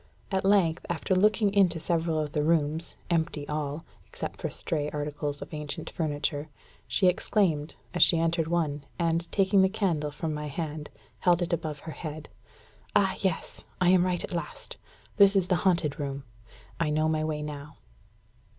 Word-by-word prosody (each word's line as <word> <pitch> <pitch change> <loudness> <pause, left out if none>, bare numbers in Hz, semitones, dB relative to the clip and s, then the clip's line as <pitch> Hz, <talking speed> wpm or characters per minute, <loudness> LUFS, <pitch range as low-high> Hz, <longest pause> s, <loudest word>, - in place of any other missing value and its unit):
At 190 -1 +1
length, 190 -5 +3
after 175 +2 0
looking 205 +2 +3
into 185 -5 +4
several 165 -1 0
of 150 -1 -1
the 150 -2 0
rooms, 160 +1 +1 0.2
empty 160 -3 0
all, 150 +1 -3 0.2
except - - -6
for - - -1
stray 150 -4 -2
articles 145 -1 -3
of - - -13
ancient 150 +2 -5
furniture, 150 -1 -2 0.4
she 195 - +2
exclaimed, 180 -4 +2 0.2
as 175 - 0
she 170 - +7
entered 165 0 +1
one, 155 -4 0
and, 170 0 0
taking 195 0 +4
the 190 - +4
candle 175 -8 0
from 155 +2 -3
my 150 0 -4
hand, 150 0 -4 0.3
held 175 -1 +3
it 175 - -2
above 155 -3 -2
her 160 - -7
head 155 -1 -7 0.7
"Ah, 190 -2 +4
yes! 190 -4 -2 0.2
I 180 - +4
am 180 -1 +6
right 180 -1 0
at - - -5
last. 170 - -5 0.4
This 200 -1 +7
is 190 -2 +2
the 180 - +3
haunted 155 -5 0
room. 140 -1 -3 0.6
I 165 -2 +1
know 155 +1 +2
my 155 -1 +1
way 155 -1 -2
now." 150 0 -7
160 Hz, 170 wpm, -28 LUFS, 150-180 Hz, 0.7 s, she